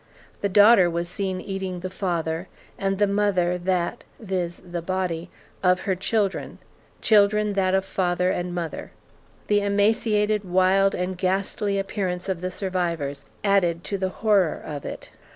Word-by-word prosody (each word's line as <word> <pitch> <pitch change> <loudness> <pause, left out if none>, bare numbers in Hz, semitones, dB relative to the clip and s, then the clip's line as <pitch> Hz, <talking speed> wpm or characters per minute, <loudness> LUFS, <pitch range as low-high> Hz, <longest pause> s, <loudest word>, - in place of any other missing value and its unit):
The 200 - -1
daughter 205 -2 +7
was 170 0 -2
seen 190 0 -3
eating 190 -2 -4
the 185 - -4
father; 170 -2 -2 0.3
and 195 -1 -1
the 205 - +4
mother, 195 -3 +1
that 180 +4 -1 0.2
[viz. 185 -5 -3
body] 175 0 -3 0.3
of 180 0 +3
her 195 - 0
children; 195 +1 -1 0.5
children, 210 -1 +4
that 190 -1 +2
of 190 0 +1
father 180 -1 0
and 175 0 -2
mother. 170 -2 -4 0.6
The 205 0 +2
emaciated, 210 +1 +2
wild, 190 +1 +3
and 180 +1 -2
ghastly 200 +2 0
appearance 190 -2 -2
of 180 -3 -2
the 185 - -2
survivors 170 -7 -3 0.2
added 175 -4 +2
to 200 - -3
the 190 0 0
horror 200 -4 +2
of 145 -2 -6
it. - - -7
190 Hz, 145 wpm, -24 LUFS, 180-200 Hz, 0.6 s, daughter